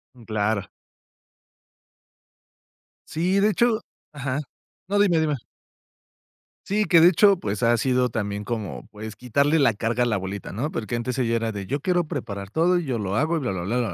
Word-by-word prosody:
Mm, 120 - -15
claro. 105 -2 -1 2.4
Sí, 185 +5 +1
de 210 +2 +4
hecho 225 +2 +2 0.3
ajá. 140 -1 -3 0.5
No, 205 +1 +1
dime, 180 -6 +4
dime. 150 -2 +1 1.3
Sí, 210 +1 +1
que 165 -3 +6
de 170 - +8
hecho, 195 +2 +5
pues, 100 +2 -3
ha 120 +1 +4
sido 125 0 +2
también 105 -2 -3
como, 105 - -4
pues, 110 +1 -8
quitarle 140 +6 +1
la 135 -6 +4
carga 115 +3 0
a - - +2
la 115 -3 +1
abuelita, 95 +1 -5
¿no? 135 +10 -3
Porque 115 +2 -3
antes 120 +2 -3
ella 115 -2 +1
era 115 -1 -1
de: 100 -2 -5
"Yo 140 +6 -2
quiero 175 +1 +1
preparar 100 - -5
todo, 175 +5 +3
y 175 - -2
yo 125 -4 -2
lo 100 0 -2
hago 160 +6 +1
y - - 0
bla, 125 -7 -2
bla, 95 -2 -3
blá, 115 +7 -1
bla, 120 -2 0
125 Hz, 190 wpm, -24 LUFS, 110-160 Hz, 2.4 s, de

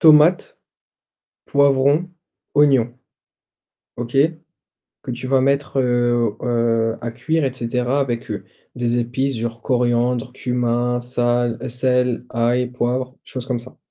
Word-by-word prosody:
Tomate, 155 +3 +5 0.9
poivron, 140 +4 +3 0.4
oignon. 135 -5 +4 1.0
OK? 120 +2 -4 0.9
Que - - -6
tu 125 +1 -5
vas 130 0 +3
mettre, 140 +1 +1
heu, 120 -3 +1
heu, 115 -2 +1
à 115 0 -4
cuire 150 +7 -1
et 135 - 0
cetera 125 +2 -1
avec, 120 -4 -2
heu, - - -4 0.3
des 120 0 0
épices 125 +3 -1
genre 115 0 -4
coriandre, 125 -1 +1
cumin, 120 -1 0
sale 120 -1 0
sel, 125 0 +1
ail, 120 +2 +1
poivre, 125 +1 -2
choses 130 -2 -7
comme 125 -3 -1
ça. 130 +2 -14
125 Hz, 120 wpm, -20 LUFS, 120-130 Hz, 1.0 s, Tomate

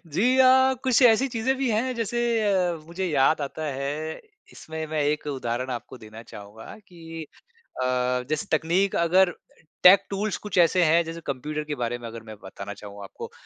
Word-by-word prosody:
जी 230 - +1
अ, 260 0 +6
कुछ 260 0 +3
ऐसी 245 +2 +5
चीज़ें 245 +2 -1
भी 270 -2 -1
हैं, 240 +4 0
जैसे 235 0 -2 0.3
अ, 180 -3 +1
मुझे 185 +3 -4
याद 150 0 +2
आता 145 +2 -5
है, 145 +3 -4 0.3
इसमें 160 0 -7
मैं 155 -1 -1
एक 150 +1 -1
उदाहरण 130 -2 -3
आपको 125 +1 -7
देना 110 +1 -12
चाहूँगा, 105 0 -12 0.2
कि 165 -2 -9 0.6
अ, - - 0 0.4
जैसे 155 -1 -2
तकनीक 180 +5 0
अगर 175 +2 +3 0.5
टेक 185 +2 +8
टूल्स 205 +1 -2
कुछ 210 -3 -6
ऐसे 175 +1 +4
हैं, 165 +1 +4
जैसे 165 +1 -7
कम्प्यूटर 150 +3 -4
के 150 -1 -5
बारे 120 -2 -3
में 120 -1 -9
अगर 115 0 -9
मैं 110 -1 -10
बताना 100 +1 -8
चाहूँ 100 0 -11
आपको, 100 - -9
160 Hz, 180 wpm, -25 LUFS, 135-195 Hz, 0.6 s, टेक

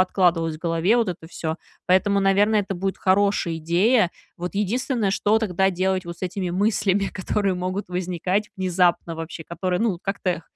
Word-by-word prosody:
откладывалось 175 -4 +2
в - - -16
голове 170 +6 +2
вот 230 -4 +1
это 170 -2 -5
всё. 160 -1 -4 0.3
Поэтому, 200 +2 +3
наверное, 205 +2 +3
это 195 -1 -4
будет 190 +2 -2
хорошая 195 -3 +2
идея. 180 +6 +3 0.3
Вот 180 +1 -5
единственное, 215 +1 0
что 210 +2 +2
тогда 190 -3 +1
делать 185 +1 0
вот 170 0 -8
с - - -21
этими 185 0 -2
мыслями, 200 +1 +1
которые 195 +1 -1
могут 185 +2 -3
возникать 180 +3 -1
внезапно 180 -2 +1
вообще, 165 0 -7
которые, 180 +2 -2
ну, 215 -7 +1
как-то 185 -4 -2
185 Hz, 165 wpm, -23 LUFS, 175-200 Hz, 0.3 s, Поэтому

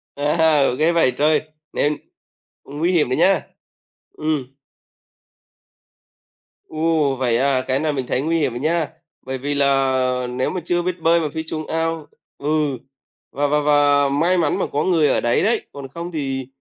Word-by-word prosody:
À, 150 -1 +3
ghê 160 +2 +3
vậy 165 -6 +3
trời! 155 +2 +3 0.3
Nên 150 +1 +1 0.7
nguy 150 +6 -1
hiểm 155 -8 +2
đấy 130 - 0
nhá, 190 +3 +4 0.7
ừm. 145 -4 -3 2.1
Ồ! 155 -3 0
Vậy 125 -3 +1
à, 135 0 +2
cái 130 +1 +1
này 155 -1 0
mình 130 -2 -3
thấy 130 - 0
nguy 165 +2 0
hiểm 125 -5 -1
nha. 160 0 +1 0.3
Bởi 130 0 -5
vì 145 +3 -3
là 130 -2 +1
nếu 125 +1 -1
mà 185 - -4
chưa 175 0 0
biết 180 0 -3
bơi 170 +1 +4
mà 155 -3 -2
phi 160 -1 -3
xuống 155 -1 -5
ao 165 -1 -2 0.3
ừ, 150 -2 0 0.5
và 145 +1 0
và 150 +1 +2
và 145 -1 +3
may 170 +6 +2
mắn 160 -4 +1
mà - - 0
có 145 - +1
người 165 -5 +3
ở - - +1
đấy 120 - +1
đấy, 225 +1 +1
còn 140 -1 -8
không 170 +5 -7
thì 135 -5 -3
150 Hz, 170 wpm, -20 LUFS, 135-165 Hz, 2.1 s, nhá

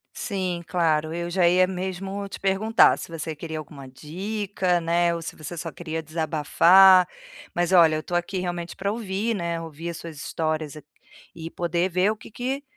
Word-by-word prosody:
Sim, 185 -5 -3
claro. 160 -2 0
Eu 175 0 -3
já 175 -1 +3
ia 185 +1 +4
mesmo 190 +2 -4
te - - -9
perguntar, 195 +3 +4
se - - -7
você 160 -1 -5
queria 160 +1 -6
alguma 140 -2 -10
dica, 185 +5 -2
né, 170 +1 +1
ou 165 - -5
se 160 - -7
você 155 +3 -8
só 165 0 -5
queria 160 0 -5
desabafar. 170 +4 +5 0.5
Mas 175 +1 0
olha, 165 -3 +6
eu - - -2
estou 175 +2 -3
aqui, 175 +2 -2
realmente, 175 -1 -4
pra 200 +1 -2
ouvir, 220 0 -2
né, 170 -3 -2
ouvir 165 +1 -6
as 170 - -7
suas 165 -3 -9
histórias 155 0 -3
aq 150 - -11 0.5
e 165 0 -7
poder 175 +1 -1
ver 185 +4 +2
o 220 - -3
que - - -14
que, 265 +5 -3
175 Hz, 190 wpm, -24 LUFS, 160-190 Hz, 0.5 s, olha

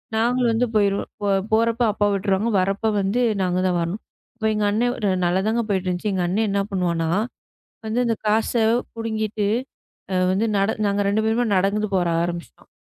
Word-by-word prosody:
நாங்க 240 +3 +1
வந்து 230 +2 +2
போயிருவோம் 200 -1 0
போறப்ப 230 +2 +2
அப்பா 205 -1 +1
விட்ருவாங்க 200 +3 0
வரப்ப 195 +4 0
வந்து 205 +6 0 0.2
நாங்க 180 -1 0
தான் 180 -1 +1
வரணும். 175 +6 -3 0.3
அப்ப 220 -2 -5
எங்க 210 - -1
அண்ணன் 215 -4 0
நல்லா 175 +2 +2
தான்ங்க 230 +2 +1
போயிட்டு 190 -2 0
இருந்துச்சு. 180 +4 -2
எங்க 185 -2 0
அண்ணன் 215 +5 0
என்ன 200 0 +1
பண்ணுவான்னா 170 -3 0 0.8
வந்து 220 +3 -1
அந்தக் 225 -2 -2
காச 220 +1 +1 0.4
புடுங்கிட்டு 220 -2 -2 0.9
வந்து 200 +4 +1
நட 195 +2 +2
நாங்க 200 0 +1
2 215 +2 +1
பேருமா 225 +2 +1
நடந்து 200 +3 +1
போக 185 - +3 0.2
ஆரம்பிச்சோம். 170 0 -6
205 Hz, 160 wpm, -22 LUFS, 190-220 Hz, 0.9 s, போக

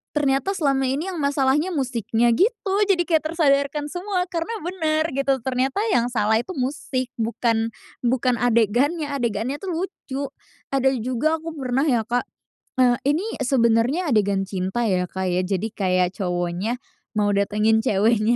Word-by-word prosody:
ternyata 285 +6 +1
selama 275 -6 +1
ini 300 +9 -2
yang 350 - -5
masalahnya 285 +4 +1
musiknya," 235 -3 +1
gitu. 395 - +1
Jadi 355 -3 +3
kayak 320 -3 +1
tersadarkan 290 -2 +1
semua 365 0 -1
karena 335 +7 -2
benar 315 -3 0
gitu. 270 -2 0
Ternyata 265 +8 0
yang 240 -5 +3
salah 220 -2 +2
itu 360 +10 -6
musik, 255 -1 -2
bukan, 225 0 0 0.3
bukan 245 0 +1
adegannya, 245 - +2
adegannya 245 0 -2
tuh 390 - -6
lucu. 320 -6 -4 0.5
Ada 265 -1 +2
juga 255 +7 0
aku 325 +1 -6
pernah 255 +1 0
ya, 240 -7 +1
Kak, 245 +1 0 0.5
eee, 250 -2 +4
ini 310 +7 +2 0.2
sebenarnya 255 +5 +2
adegan 200 -3 +2
cinta 190 +4 -2
ya, 185 -5 +1
Kak, 190 0 -2
ya. 180 - +1
Jadi 205 +3 -1
kayak 185 -4 +1
cowoknya 180 +4 -1 0.4
mau 205 -1 +2
datengin 210 +2 +2
ceweknya 220 +2 +2
255 Hz, 145 wpm, -23 LUFS, 220-300 Hz, 0.5 s, eee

